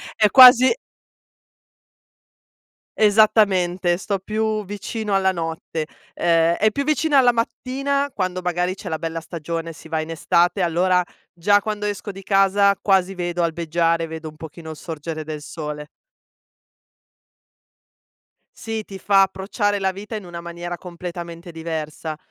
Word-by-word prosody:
è 215 -1 +4
quasi 255 0 +9 2.3
Esattamente, 200 -5 +3
sto 195 0 -3
più 215 +1 -2
vicino 205 +1 -3
alla 190 0 +3
notte. 165 -2 -4 0.3
Ehm, 165 0 +2
è 215 +1 +2
più 280 +6 -2
vicina 305 0 +2
alla 245 -1 +5
mattina, 270 +4 -2
quando 185 -2 -2
magari 180 +1 -1
c'è 195 -1 -8
la 160 -1 -3
bella 165 0 -4
stagione, 165 0 -5
si 160 0 -13
va 160 -1 -1
in 155 - -7
estate, 170 +4 +2
allora, 180 +1 +2 0.3
già 205 +4 +3
quando 210 0 -3
esco 205 0 -4
di 195 0 -10
casa 195 0 +3
quasi 195 -1 +2
vedo 175 -1 -2
albeggiare, 165 0 0
vedo 160 0 -7
un 155 - -10
pochino 160 +1 -9
sorgere 155 0 -6
del 155 -1 -6
sole. 150 -1 -6 2.7
Sì, 225 -1 -4
ti 195 -2 -10
fa 195 +1 +4
approcciare 200 +2 -1
la 190 0 0
vita 205 +3 -7
in 205 - -9
una 170 -1 -8
maniera 170 +1 -6
completamente 170 -1 -8
diversa, 160 -1 -5
180 Hz, 135 wpm, -21 LUFS, 165-205 Hz, 2.7 s, quasi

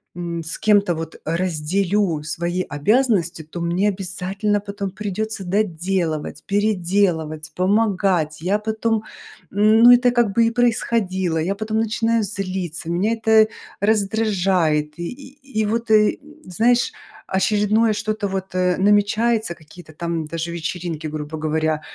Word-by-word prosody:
м, 170 -1 -4
с 165 - -6
кем-то 205 -5 +3
вот 160 0 -6
разделю 175 +1 0
свои 170 +4 -2
обязанности, 180 - +1
то 160 +3 -8
мне 175 +5 +1
обязательно 195 +2 -2
потом 200 -1 -5
придется 210 +1 -4
доделывать, 180 -4 -1
переделывать, 180 -6 0
помогать. 185 -5 +1
Я 195 +5 +1
потом, 220 0 -1 0.5
ну, 215 +4 +6
это 245 0 +5
как 240 -4 +2
бы 230 +2 +4
и - - 0
происходило. 220 -7 0
Я 180 +5 -1
потом 215 +1 -2
начинаю 225 0 +1
злиться, 185 -5 -4
меня 190 +7 +1
это 220 -1 +4 0.3
раздражает. 195 -8 +1
И 170 - -3
и 270 -2 -8
и - - 0
вот, 230 +2 -2 0.6
знаешь, 235 - +2 0.3
очередное 210 +3 +2
что-то 215 -1 -2
вот, 190 -1 -4
э, 180 -1 +1
намечается, 210 0 +2
какие-то 155 +1 -15
там 170 0 -3
даже 165 +1 -4
вечеринки, 170 -1 -4
грубо 155 0 -5
говоря. 155 0 0
195 Hz, 125 wpm, -21 LUFS, 170-215 Hz, 0.6 s, ну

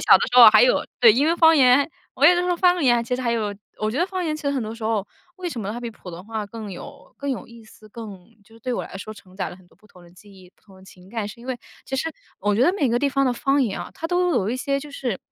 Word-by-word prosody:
小 - - +6
的 - - -5
时 250 - +5
候 235 -3 +12
还 215 +1 +6
有 250 - +3 0.2
对， 230 -3 +8
因 275 +6 +2
为 335 +2 +2
方 325 -1 +6
言 265 +2 +5 0.3
我 280 - +1
有 355 - +7
的 350 - +1
时 360 - -2
候， 355 - +1
方 360 -2 +3
言 240 -3 +3
其 250 - -2
实 255 - -4
还 235 -1 0
有 210 -3 -2 0.2
我 215 0 -1
觉 255 - -3
得 350 - +2
方 370 -2 -4
言 310 -1 -1
其 305 - -8
实 280 - 0
很 270 -4 -1
多 220 +1 -6
时 230 - -12
候 215 -2 -1 0.3
为 365 -1 -4
什 245 -8 -6
么 200 0 -4
它 235 - -5
比 235 - -5
普 195 -4 -12
通 175 +2 -10
话 220 -1 -5
更 215 -1 -8
有 175 - -12
更 280 0 -3
有 255 - -4
意 230 -1 -15
思， 215 0 -18
更 205 -5 -10 0.2
就 225 +2 -22
是 225 - -18
对 250 +2 -3
我 - - -2
来 - - -9
说 215 +2 -8
承 185 -3 -17
载 - - -3
了 175 - -11
很 185 - -21
多 - - -27
不 215 - -24
同 180 -3 -19
的 170 - -17
记 200 +3 -18
忆、 185 -2 -17
不 - - -35
同 195 -3 -19
的 190 - -17
情 185 0 -17
感， 220 -3 -3
是 210 - -11
因 245 - -13
为 255 -2 -3 0.3
其 265 - -4
实 325 +5 -2 0.3
我 205 +1 +1
觉 230 - +2
得 350 - +4
每 300 -9 0
个 240 +1 +1
地 285 - +1
方 275 0 +1
的 250 - +2
方 275 +2 +1
言 205 -6 -2
啊， - - -7
它 325 - -5
都 360 0 +1
有 200 - 0
一 250 - -1
些 275 +2 -1
就 295 - -10
是 250 -8 -4
235 Hz, 360 characters per minute, -23 LUFS, 210-280 Hz, 0.3 s, 候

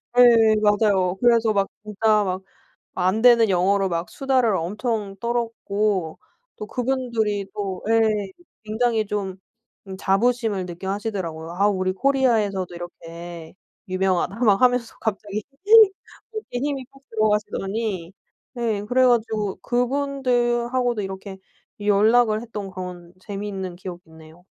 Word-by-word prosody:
네. 230 -3 +6
맞아요. 205 -3 +3
그래서 230 -2 +4
막 195 -1 +1 0.2
진짜 210 0 +2
막 185 0 -2 0.6
안 185 +5 +1
되는 235 -3 +6
영어로 190 +2 +2
막 170 0 -2
수다를 255 -7 +1
엄청 205 +3 -3
떨었고 215 -7 -1 0.4
또 210 - -6
그분들이 235 -5 -1
또 195 -3 -4
예 225 0 +4 0.6
굉장히 220 0 0
좀 195 -2 -3 0.6
자부심을 210 0 +1
느껴 180 +2 -7
하시더라고요. 185 -6 -4
아 200 +3 +2
우리 185 -2 0
코리아에서도 215 -7 +1
이렇게 170 -1 -9 0.3
유명하다 185 +1 0
막 205 +1 +4
하면서 245 -2 +2
갑자기 210 -1 -3 0.9
어깨 430 - -5
힘이 275 -1 -2
팍 275 0 -20
들어가시더니 210 -3 -1 0.4
네. 225 -4 -1
그래 255 +4 +3
가지고 220 -4 +1
그분들하고도 245 -2 0
이렇게 190 0 -7 0.4
연락을 215 +2 +3
했던 210 -4 -6
그런 180 -2 -8
재미있는 195 -3 -5
기억이 180 -1 -8
있네요. 160 +2 -16
210 Hz, 280 characters per minute, -23 LUFS, 190-235 Hz, 0.9 s, 네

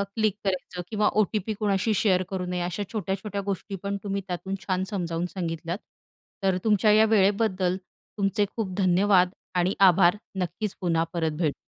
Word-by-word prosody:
Click 215 -3 +1
करायचं 185 -2 -2
किंवा 210 -1 +2
OTP 215 +1 -1
कोणाशी 210 +1 +1
शेअर 185 -3 +3
करू 185 -2 -3
नये. 180 0 -2
अशा 180 +4 -3
छोट्या-छोट्या 200 0 -3
गोष्टी 200 0 -3
पण 200 0 -2
तुम्ही 200 -1 -2
त्यातून 190 +2 -3
छान 185 0 +1
समजावून 175 -4 -2
सांगितल्यात. 170 -1 -3 0.7
तर 190 -1 +2
तुमच्या 210 -1 +4
या 215 +1 +6
वेळेबद्दल 195 -3 +2 0.4
तुमचे 205 +1 +1
खूप 205 -5 -3
धन्यवाद 185 0 +4 0.3
आणि 180 +2 +2
आभार. 185 -1 +6 0.3
नक्कीच 180 +4 -3
पुन्हा 165 -2 +2
परत 165 -2 0
भेटू. 155 -4 +1
190 Hz, 155 wpm, -26 LUFS, 180-205 Hz, 0.7 s, या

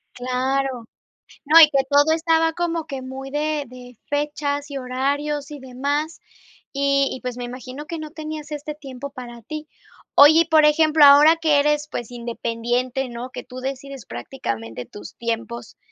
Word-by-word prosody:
Claro. 255 0 -2 0.6
No, 315 +3 +7
y 305 - +9
que 275 -2 +2
todo 290 +2 +4
estaba 325 0 +2
como 335 -1 -2
que 275 -4 -6
muy 265 +1 -7
de 300 0 -1
de 250 -1 -13
fechas 290 0 -2
y 280 - -5
horarios 280 +3 -2
y 295 - -7
demás, 285 +5 -3 0.5
y 275 0 +2
y, 260 - -6
pues, 250 -1 -5
me 245 - -4
imagino 255 +3 -8
que 330 +1 -6
no 310 -1 -7
tenías 310 -1 -7
este 295 0 -5
tiempo 280 -2 -8
para 240 -3 -10
ti. 305 +6 -7 0.5
Oye, 305 +3 +8
y - - +1
por 315 -1 +5
ejemplo, 305 0 +5
ahora 295 +3 +8
que 310 -3 +3
eres, 295 +1 +1
pues, 240 -5 -6
independiente, 240 +2 -2
¿no?, 240 +1 -7
que 260 - -8
tú 255 - -12
decides 270 -1 -6
prácticamente 115 - -6
tus 205 - -11
tiempos, 235 0 -5
280 Hz, 165 wpm, -22 LUFS, 250-300 Hz, 0.6 s, y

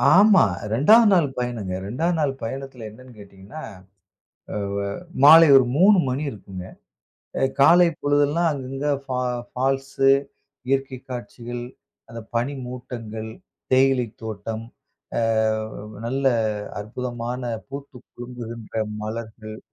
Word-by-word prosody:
ஆமா, 200 -2 +7 0.3
2ஆவது 215 - +6
நாள் 170 -6 +4
பயணங்க. 120 -6 -3
2ஆவது 160 - -1
நாள் 145 -3 +1
பயணத்தில 130 -1 -6
என்னன்னு 125 +3 -15
கேட்டீங்கன்னா 100 +7 -11 1.1
வ்வ 100 - -2 0.4
மாலை 160 +3 +10
ஒரு 130 - +6
3 195 +3 +6
மணி 130 +3 -2
இருக்குங்க 95 -4 -9 0.8
அ. - - -2 0.2
காலை 170 +5 +7
பொழுதெல்லாம் 145 +4 +2
அங்க 135 -3 -5
அங்க 135 +2 -2 0.2
ஃபா 130 -2 -3 0.3
ஃபால்ஸ். 135 +1 -2 0.7
இயற்கை 135 -1 -1
காட்சிகள், 120 0 -6 0.5
அந்த 115 0 -8
பனி 120 +5 0
மூட்டங்கள், 115 -3 -7 0.4
தேயிலை 130 -2 +3 0.2
தோட்டம். 110 +1 -5 0.6
அ - - +1 0.8
நல்ல 135 +3 -2 0.6
அற்புதமான 120 +2 -5 0.3
பூத்து 140 -1 -8 0.2
குலுங்குகின்ற 120 -2 -8 0.3
மலர்கள். 110 0 -7
125 Hz, 105 wpm, -23 LUFS, 115-140 Hz, 1.1 s, மாலை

